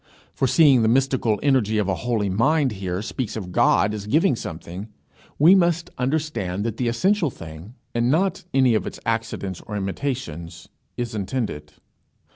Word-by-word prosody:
For, 135 - +1
seeing 140 -3 +5
the 110 - +3
mystical 125 -3 +2
energy 125 -7 +2
of 105 -2 +1
a 100 - +1
holy 110 0 -1
mind 135 +8 +2
here 95 -1 -4
speaks 115 -1 -4
of 95 -5 -5
God 100 +3 +3
as 105 -1 -6
giving 155 - +3
something, 90 +1 -7 0.5
we 160 +6 +7
must 170 -2 +2
understand 125 - -2
that 115 -1 -3
the 125 - -1
essential 175 - +2
thing, 80 +3 -11 0.2
and 120 +1 +1
not 175 +6 +1
any 130 -4 +4
of 110 - 0
its - - -7
accidents 110 -5 -2
or 105 - -4
imitations, 95 - -4 0.3
is 120 -1 -3
intended. 100 - -4
115 Hz, 160 wpm, -23 LUFS, 100-135 Hz, 0.5 s, we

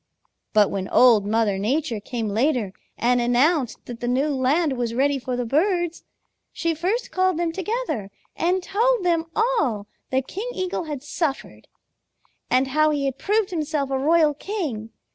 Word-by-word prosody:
"But 210 -2 +4
when 190 -1 -3
Old 225 -5 +5
Mother 215 -2 +1
Nature 245 +2 -1
came 225 +1 -4
later 225 -2 0 0.2
and 245 +1 +2
announced 250 +3 +1
that 240 -1 -8
the 240 - -3
new 265 +5 +1
land 285 +3 +1
was 240 -2 -2
ready 275 +2 +2
for 255 0 -3
the 245 0 -2
birds, 345 - 0 0.5
she 335 -1 -1
first 370 +10 -2
called 370 -2 +1
them 340 -1 0
together 380 - -3 0.3
and 360 +2 0
told 450 +2 +1
them 335 -2 +2
all 435 - +1 0.2
that 260 0 0
King 430 +6 -5
Eagle 370 -2 -2
had 290 -4 -5
suffered, 295 -1 -3 0.8
and 260 +1 +2
how 310 +3 +3
he 290 -2 0
had 270 0 -2
proved 420 +2 +1
himself 300 -4 -2
a 265 - 0
royal 310 +1 +4
king. 290 - -4
285 Hz, 160 wpm, -23 LUFS, 245-345 Hz, 0.8 s, Old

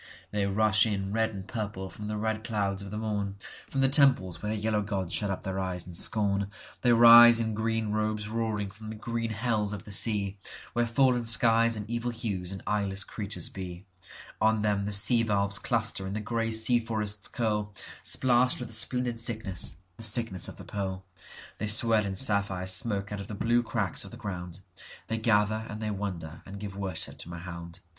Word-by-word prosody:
They 100 -1 0
rush 105 +1 +3
in 100 -2 -2
red 110 0 +1
and 95 -3 -8
purple 105 -3 -4
from 105 - -8
the 105 0 -3
red 110 0 -2
clouds 100 -2 -2
of 100 - -8
the 105 - -5
morn, 105 -3 -3 0.3
From 135 - -1
the 135 - +4
temples 130 - +3
where 105 - -3
the 110 - -2
yellow 105 0 0
gods 95 -4 -3
shut 105 - -1
up 95 - -4
their 95 0 -3
eyes 90 -2 -3
in 90 - -10
scorn; 100 +2 -1 0.3
They 120 - +3
rise 120 0 +9
in 110 -1 -1
green 110 0 -1
robes 105 0 -1
roaring 110 -2 -2
from 110 +2 -10
the 110 - -6
green 115 +1 -3
hells 110 -2 -1
of 100 - -7
the 105 - -11
seaWhere 105 +3 -2
fallen 125 0 +2
skies 115 +1 +4
and 105 0 -6
evil 120 +1 -2
hues 105 -7 -4
and 95 - -7
eyeless 100 -1 -1
creatures 105 -1 -3
be, 90 0 -8 0.6
On 110 0 +3
them 100 -2 0
the - - -2
sea 115 +4 +5
valves 100 -2 +1
cluster 115 -5 0
and 95 - -4
the - - -2
grey 115 +1 -2
sea 110 +2 +5
forests 105 -3 -2
curl, 105 -3 -2 0.3
Splashed 125 0 +3
with 120 -2 -6
a - - -2
splendid 120 +1 +1
sickness, 110 -8 +1 0.2
the 115 - -8
sickness 110 -4 +1
of - - -8
the - - -11
pearl; 95 -2 -4 0.5
They 105 - -2
swell 110 0 +4
in 95 - -4
sapphire 100 -4 +1
smoke 100 +1 +1
out 105 -1 -4
of 100 - -8
the 105 - -6
blue 120 +3 +2
cracks 110 -5 0
of 100 - -8
the 120 - -11
ground,—They 95 +2 -7
gather 110 0 +1
and 105 - -6
they 110 -1 -3
wonder 90 -6 -5
and 100 +1 -8
give 100 -1 -7
worship 95 -4 -4
to - - -10
Mahound. 85 0 -8
105 Hz, 195 wpm, -28 LUFS, 100-115 Hz, 0.6 s, rise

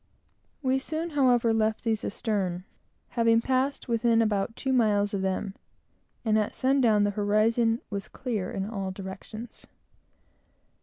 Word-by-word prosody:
We 260 0 +2
soon, 320 +4 -4
however, 245 -5 +3
left 220 0 0
these 225 -3 0
astern, 195 -5 -2 0.5
having 230 -1 +3
passed 265 +4 0
within 230 -1 +2
about 215 0 0
two 265 -1 -1
miles 210 -4 +2
of 195 - -1
them; 190 +1 -2 0.7
and 220 -1 +3
at 210 - -2
sundown 255 -6 +3
the 205 - +2
horizon 225 +3 +2
was 200 -1 -4
clear 220 -8 -3
in 195 - -3
all 195 -3 -3
directions. 195 +4 -8
225 Hz, 135 wpm, -27 LUFS, 205-245 Hz, 0.7 s, however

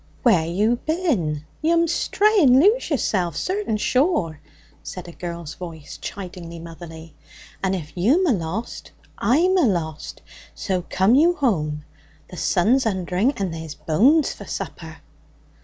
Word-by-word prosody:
'Where 180 -10 +4
you 210 +8 +1
bin? 235 - -1 0.2
You'm 335 +1 +3
stray 415 +5 +2
and 260 -3 +6
lose 425 - +3
yourself, 190 - 0
certain 375 - -1
sure!' 250 - +1 0.4
said 180 -1 -8
a - - -8
girl's 170 -3 -6
voice, 165 -5 -9
chidingly 175 -3 -7
motherly. 165 -1 -10 0.5
'And 190 0 +1
if 160 -5 -7
you'm 260 - +3
alost, 205 - -3 0.3
I'm 345 +10 +3
alost; 170 - -1 0.3
so 185 -3 -2
come 190 +5 +3
you 330 +6 +5
whome. 155 - -1 0.5
The 180 - -9
sun's 225 +11 +2
undering, 190 +5 0
and 190 -4 -2
there's 160 -2 -7
bones 265 - +3
for - - -11
supper!' - - -6
190 Hz, 130 wpm, -22 LUFS, 170-280 Hz, 0.5 s, and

